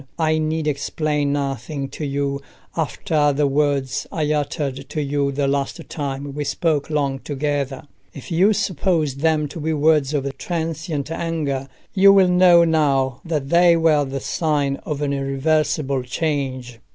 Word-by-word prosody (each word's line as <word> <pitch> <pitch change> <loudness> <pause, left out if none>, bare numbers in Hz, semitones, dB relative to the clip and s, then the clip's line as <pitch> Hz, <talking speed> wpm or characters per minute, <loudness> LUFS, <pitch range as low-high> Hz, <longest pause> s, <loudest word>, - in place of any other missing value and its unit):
I 155 -1 +2
need 155 0 -1
explain 150 0 -1
nothing 140 0 -3
to - - -7
you 140 0 -2 0.3
after 155 -1 +1
the 145 +1 +1
words 140 -2 0
I 155 -5 0
uttered 145 -2 -3
to 155 - -3
you 140 -1 0
the 140 0 0
last 140 0 -1
time 140 -1 -4
we 145 +1 -3
spoke 150 0 0
long 140 -3 0
together. 145 -1 -2 0.3
If 140 - -11
you 185 +6 +4
supposed 165 -7 0
them 155 -1 +2
to 165 - -8
be 160 +1 -1
words 150 -1 +2
of 140 -1 -2
transient 160 -3 -3
anger, 155 -5 -2 0.3
you 195 0 +7
will 195 -2 +5
know 180 -1 +6
now 140 -5 +1
that 150 -5 -2
they 170 0 +5
were 160 -3 +3
the 135 0 -4
sign 145 -4 0
of 150 -1 -4
an 140 -1 0
irreversible 140 0 0
change. 130 -3 -3
145 Hz, 150 wpm, -21 LUFS, 140-160 Hz, 0.3 s, you